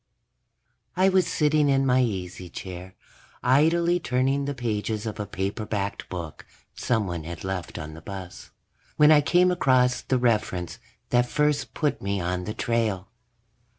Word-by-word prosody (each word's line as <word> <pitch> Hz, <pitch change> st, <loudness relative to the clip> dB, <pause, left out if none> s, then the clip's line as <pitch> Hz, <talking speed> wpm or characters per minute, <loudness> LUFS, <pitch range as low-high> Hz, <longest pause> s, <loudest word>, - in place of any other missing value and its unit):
I 190 Hz, +1 st, +5 dB
was 190 Hz, -1 st, +3 dB
sitting 150 Hz, -1 st, +2 dB
in 135 Hz, 0 st, +3 dB
my 130 Hz, -1 st, +3 dB
easy 90 Hz, -6 st, -3 dB
chair, 90 Hz, +1 st, -8 dB, 0.5 s
idly 165 Hz, +7 st, +3 dB
turning 135 Hz, +1 st, 0 dB
the 140 Hz, 0 st, -3 dB
pages 110 Hz, -2 st, -2 dB
of 110 Hz, -2 st, -5 dB
a 105 Hz, -, -3 dB
paperbacked 100 Hz, +1 st, -3 dB
book 85 Hz, -4 st, -6 dB, 0.3 s
someone 95 Hz, -9 st, -1 dB
had 85 Hz, +1 st, -7 dB
left 95 Hz, -2 st, -4 dB
on 75 Hz, 0 st, -6 dB
the 80 Hz, -, -11 dB
bus, 95 Hz, -1 st, -8 dB, 0.5 s
when 150 Hz, +1 st, +7 dB
I 150 Hz, -1 st, +7 dB
came 180 Hz, +5 st, +3 dB
across 130 Hz, -7 st, +3 dB
the 130 Hz, -, 0 dB
reference 110 Hz, -8 st, 0 dB, 0.3 s
that 120 Hz, 0 st, +3 dB
first 150 Hz, -1 st, 0 dB
put 150 Hz, -3 st, 0 dB
me 100 Hz, 0 st, -1 dB
on 90 Hz, +1 st, -2 dB
the 105 Hz, -, -5 dB
trail. 110 Hz, -6 st, -1 dB
115 Hz, 150 wpm, -25 LUFS, 95-140 Hz, 0.5 s, when